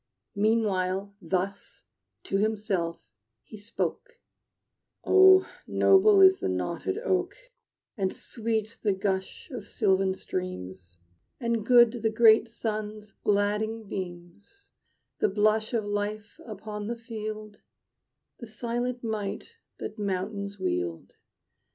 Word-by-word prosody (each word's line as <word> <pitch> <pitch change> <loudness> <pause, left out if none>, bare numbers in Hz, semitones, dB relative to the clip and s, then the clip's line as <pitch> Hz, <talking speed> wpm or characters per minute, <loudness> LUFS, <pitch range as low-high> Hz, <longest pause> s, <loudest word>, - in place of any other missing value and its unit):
Meanwhile, 200 -2 0
thus 185 +4 -3 0.4
to 195 - -1
himself 205 -5 -1 0.5
he 215 - -12
spoke: 465 - -4 0.8
"Oh, 380 0 +7 0.2
noble 395 +1 +5
is 380 0 +7
the - - -1
knotted 130 - -2
oak, 380 -5 0 0.6
And 190 -2 0
sweet 225 -1 -3
the 205 -3 +2
gush 190 - -3
of 225 -6 -7
sylvan 190 -3 +1
streams, 95 - -6 0.4
And 235 -3 -1
good 240 0 +6
the 220 - +2
great 220 0 +5
sun's 215 -1 -5
gladding 210 +3 0
beams, 185 - -8 0.5
The - - +3
blush 215 +2 +2
of 225 -4 -1
life 205 +1 -4
upon 210 -1 -6
the 235 +1 -3
field, 215 -2 -7 0.8
The 235 - -8
silent 240 +2 -3
might 215 - -4 0.2
that 215 - -7
mountains 200 +1 -3
wield. 90 - -3
210 Hz, 110 wpm, -27 LUFS, 195-230 Hz, 0.8 s, Oh